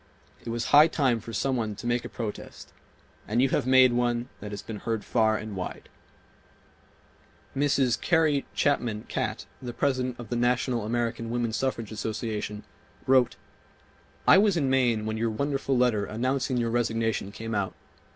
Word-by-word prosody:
It -, -, -6 dB
was 115 Hz, 0 st, -2 dB
high 150 Hz, +2 st, +9 dB
time 135 Hz, -7 st, +1 dB
for 115 Hz, +2 st, -9 dB
some 130 Hz, +4 st, 0 dB
one 110 Hz, -4 st, -2 dB
to 105 Hz, -, -9 dB
make 120 Hz, 0 st, 0 dB
a -, -, -7 dB
protest, 110 Hz, -3 st, -7 dB, 0.5 s
and 110 Hz, +3 st, 0 dB
you 135 Hz, +1 st, +4 dB
have 125 Hz, -, 0 dB
made 130 Hz, -1 st, +6 dB
one 120 Hz, 0 st, 0 dB
that 105 Hz, -, -7 dB
has 105 Hz, -1 st, -6 dB
been 110 Hz, -, -6 dB
heard 110 Hz, -1 st, -3 dB
far 110 Hz, -2 st, +2 dB
and 110 Hz, -2 st, -6 dB
wide... 90 Hz, -1 st, -6 dB, 0.8 s
." -, -, -32 dB
Mrs. 135 Hz, -3 st, +2 dB
Carrie 155 Hz, -5 st, +2 dB
Chapman 120 Hz, -7 st, 0 dB
Catt, -, -, -3 dB, 0.2 s
the 125 Hz, -2 st, -6 dB
President 130 Hz, -1 st, -1 dB
of 120 Hz, -3 st, -8 dB
the 120 Hz, -, -2 dB
National 120 Hz, -1 st, +1 dB
American 115 Hz, 0 st, -2 dB
Woman 120 Hz, -1 st, -1 dB
Suffrage 115 Hz, -3 st, -2 dB
Association, 105 Hz, -1 st, -4 dB, 0.4 s
wrote: 130 Hz, -2 st, +4 dB, 0.9 s
"I -, -, +8 dB
was 200 Hz, -3 st, +3 dB
in 140 Hz, -4 st, +1 dB
Maine 120 Hz, -5 st, +2 dB
when 110 Hz, 0 st, -2 dB
your 115 Hz, +1 st, 0 dB
wonderful 135 Hz, +3 st, -1 dB
letter 120 Hz, -5 st, +2 dB
announcing 130 Hz, +4 st, -1 dB
your 115 Hz, -1 st, 0 dB
resignation 115 Hz, -3 st, 0 dB
came 115 Hz, +2 st, -6 dB
out. 100 Hz, -3 st, -1 dB
120 Hz, 170 wpm, -27 LUFS, 110-130 Hz, 0.9 s, high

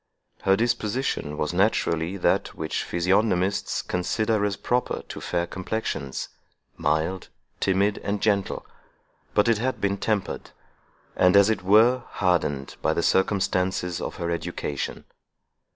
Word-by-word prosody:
Her 95 Hz, -, +4 dB
disposition 115 Hz, -, -1 dB
was 75 Hz, +3 st, -1 dB
naturally 90 Hz, -2 st, +1 dB
that 90 Hz, -, +1 dB
which 80 Hz, -, -2 dB
physiognomists 95 Hz, +2 st, +1 dB
consider 105 Hz, +4 st, 0 dB
as 100 Hz, -2 st, 0 dB
proper 125 Hz, +4 st, -1 dB
to -, -, -8 dB
fair 85 Hz, -1 st, -1 dB
complexions, 90 Hz, -7 st, -4 dB, 0.5 s
mild, 80 Hz, +5 st, -1 dB, 0.3 s
timid, 100 Hz, +2 st, +2 dB
and 100 Hz, 0 st, -2 dB
gentle; 100 Hz, -2 st, 0 dB, 0.7 s
but 105 Hz, -, +4 dB
it 115 Hz, -2 st, +3 dB
had 130 Hz, +3 st, -1 dB
been 100 Hz, 0 st, 0 dB
tempered, 105 Hz, -4 st, -2 dB, 0.7 s
and, 90 Hz, +1 st, +4 dB
as 100 Hz, +2 st, +6 dB
it 110 Hz, -, -1 dB
were, 110 Hz, +7 st, +5 dB
hardened, 75 Hz, -7 st, 0 dB
by -, -, +1 dB
the -, -, 0 dB
circumstances 95 Hz, -2 st, +1 dB
of -, -, -4 dB
her 85 Hz, 0 st, -3 dB
education. 75 Hz, -4 st, -4 dB
95 Hz, 125 wpm, -25 LUFS, 90-105 Hz, 0.7 s, as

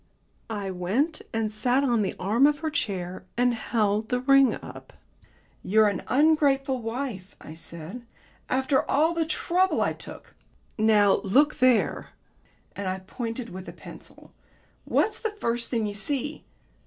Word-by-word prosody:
I 200 Hz, -3 st, -3 dB
went 215 Hz, -, -1 dB
and 220 Hz, -1 st, -2 dB
sat 250 Hz, +5 st, +1 dB
on 240 Hz, -5 st, +2 dB
the 195 Hz, -, -2 dB
arm 225 Hz, +9 st, +4 dB
of 295 Hz, 0 st, 0 dB
her 315 Hz, -1 st, -2 dB
chair, 185 Hz, -, -3 dB
and 245 Hz, 0 st, +3 dB
held 215 Hz, -2 st, 0 dB
the 250 Hz, -, +1 dB
ring 275 Hz, 0 st, +5 dB
up. -, -, -11 dB, 0.7 s
"You're 215 Hz, +2 st, +4 dB
an 200 Hz, -, -3 dB
ungrateful 275 Hz, -3 st, +3 dB
wife," 225 Hz, -5 st, -5 dB
I 155 Hz, -, -10 dB
said, 165 Hz, +7 st, -7 dB, 0.5 s
"after 265 Hz, +1 st, +2 dB
all 315 Hz, +4 st, +3 dB
the 330 Hz, -2 st, -1 dB
trouble 360 Hz, +4 st, +1 dB
I -, -, +1 dB
took. -, -, -12 dB, 0.4 s
Now 215 Hz, -2 st, +4 dB
look 285 Hz, +10 st, +2 dB
there," 255 Hz, -3 st, +2 dB, 0.7 s
and 200 Hz, -1 st, -4 dB
I 185 Hz, 0 st, -1 dB
pointed 230 Hz, +2 st, -5 dB
with 185 Hz, +1 st, -8 dB
a -, -, -9 dB
pencil, -, -, -12 dB, 0.5 s
"what's 435 Hz, -, +1 dB
the 445 Hz, -, -1 dB
first 235 Hz, -, -1 dB
thing 230 Hz, -3 st, 0 dB
you 205 Hz, -, -3 dB
see?" 285 Hz, +8 st, -3 dB
235 Hz, 150 wpm, -26 LUFS, 205-275 Hz, 0.7 s, ring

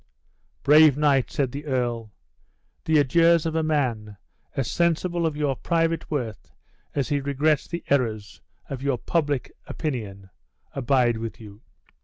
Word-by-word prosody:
"Brave 150 Hz, 0 st, +6 dB
knight," 145 Hz, -3 st, +2 dB
said 135 Hz, -4 st, -1 dB
the 145 Hz, +3 st, -7 dB
earl, 120 Hz, -5 st, -2 dB, 0.7 s
"the 160 Hz, -1 st, +3 dB
adieus 165 Hz, +4 st, +4 dB
of 160 Hz, -, -1 dB
a 160 Hz, -, +1 dB
man, 120 Hz, -10 st, -1 dB, 0.4 s
as 135 Hz, -4 st, -1 dB
sensible 170 Hz, 0 st, +1 dB
of 150 Hz, -2 st, -4 dB
your 145 Hz, -3 st, 0 dB
private 165 Hz, +2 st, -1 dB
worth 120 Hz, -9 st, -4 dB, 0.5 s
as 140 Hz, -3 st, -1 dB
he 145 Hz, -1 st, 0 dB
regrets 145 Hz, +2 st, +1 dB
the 170 Hz, 0 st, -5 dB
errors 115 Hz, -7 st, -1 dB, 0.3 s
of 135 Hz, -2 st, -6 dB
your 135 Hz, -2 st, 0 dB
public 145 Hz, -2 st, -1 dB, 0.2 s
opinion, 100 Hz, -, -5 dB, 0.4 s
abide 125 Hz, -3 st, +2 dB
with 115 Hz, 0 st, -6 dB
you." 105 Hz, -1 st, -12 dB
140 Hz, 140 wpm, -24 LUFS, 120-155 Hz, 0.7 s, Brave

